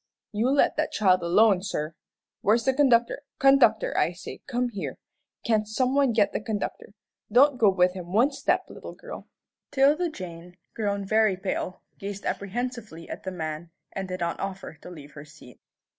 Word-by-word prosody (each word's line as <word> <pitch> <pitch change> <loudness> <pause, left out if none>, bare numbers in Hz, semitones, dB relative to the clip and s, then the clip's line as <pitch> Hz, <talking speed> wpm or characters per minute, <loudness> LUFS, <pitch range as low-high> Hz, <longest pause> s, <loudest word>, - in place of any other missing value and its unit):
"You 220 +4 +1
let 280 +1 +3
that 310 0 0
child 185 -3 +3
alone, 190 +3 +4
sir. 160 -5 -3 0.5
Where's 225 +3 +2
the 265 - +3
conductor? 255 -2 +3 0.2
Conductor, 275 - +4
I - - +2
say, - - -9
come 250 -2 -1
here. 200 -4 -5 0.5
Can't 215 -2 +1
some 255 +4 0
one 275 -2 +3
get 215 -3 +2
the - - -2
conductor? 205 -1 -5 0.4
Don't 260 +3 +5
go 215 - +6
with 180 -1 +3
him 180 -2 -8
one 240 +9 +3
step, - - 0
little - - -10
girl." - - -10 0.4
'Tilda 290 +5 +3
Jane, 180 - -9 0.2
grown 200 -2 -2
very 215 -1 +3
pale, 185 -1 -4 0.2
gazed 200 0 -6
apprehensively 215 -4 -4
at - - -8
the 190 - -3
man, 160 -1 -5 0.2
and 195 -1 -5
did 185 -1 -5
not 170 0 -2
offer 195 -2 -5
to - - -10
leave 150 -4 -11
her 145 - -10
seat. 150 -5 -16
205 Hz, 175 wpm, -26 LUFS, 180-245 Hz, 0.5 s, go